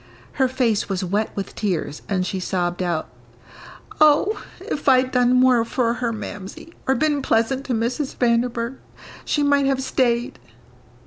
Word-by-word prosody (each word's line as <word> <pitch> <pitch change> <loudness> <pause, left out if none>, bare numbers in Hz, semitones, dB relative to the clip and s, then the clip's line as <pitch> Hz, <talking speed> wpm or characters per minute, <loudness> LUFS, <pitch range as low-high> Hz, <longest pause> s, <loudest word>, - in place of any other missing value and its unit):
Her 260 - +5
face 240 -6 0
was 190 -1 -1
wet 205 +4 0
with 200 - -5
tears, 175 -7 -2
and 185 -2 0
she 190 0 -3
sobbed 180 -1 -2
out, 170 -3 -1 0.9
"Oh, 310 +8 +4 0.2
if 290 - -1
I'd 255 0 +4
done 250 -1 +3
more 250 -2 +5
for 230 0 0
her, 240 -1 -2
Mamsie, 210 - -8
or 265 - +3
been 300 -1 +1
pleasant 260 +3 +1
to 250 - -1
Mrs. 250 +5 -2
Vanderburgh, 235 +1 0 0.5
she 295 - +1
might 285 -1 +3
have 265 -1 0
stayed." 240 -2 0
240 Hz, 150 wpm, -22 LUFS, 210-265 Hz, 0.9 s, Her